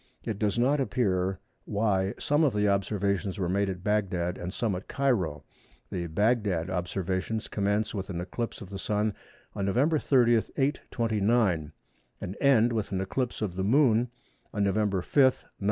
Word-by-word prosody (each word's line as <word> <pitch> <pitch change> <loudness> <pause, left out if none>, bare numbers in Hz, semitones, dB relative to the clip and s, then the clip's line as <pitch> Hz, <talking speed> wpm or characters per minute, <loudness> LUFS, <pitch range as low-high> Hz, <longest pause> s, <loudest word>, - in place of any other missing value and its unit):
It 105 -3 -4
does 105 +1 0
not 135 +5 +3
appear 95 -8 0 0.3
why 100 -2 0
some 145 +2 +2
of 135 -8 +2
the 105 0 +2
observations 100 0 0
were 95 -3 -1
made 100 +2 +1
at 90 -1 -5
Bagdad 95 -4 0
and 90 0 -5
some 110 +1 -1
at 90 +2 -5
Cairo. 95 - 0 0.5
The 85 -2 -3
Bagdad 100 -2 +1
observations 95 +4 -2
commence 105 +1 0
with 95 -2 -4
an 90 -3 -3
eclipse 105 +8 -4
of 100 -2 -9
the 95 - -5
Sun 105 +1 0 0.4
on 100 - -2
November 145 +10 +2
30, 120 -5 +4 0.2
829, 110 - +1 0.5
and 95 - -5
end 120 -4 +4
with 110 -3 -2
an 95 - -1
eclipse 120 +5 -2
of 90 -4 -3
the 95 - -1
Moon 120 0 +3 0.4
on 105 - 0
November 100 -2 +1
5, - - -22
933. 130 -2 +4
105 Hz, 165 wpm, -28 LUFS, 95-115 Hz, 0.5 s, 30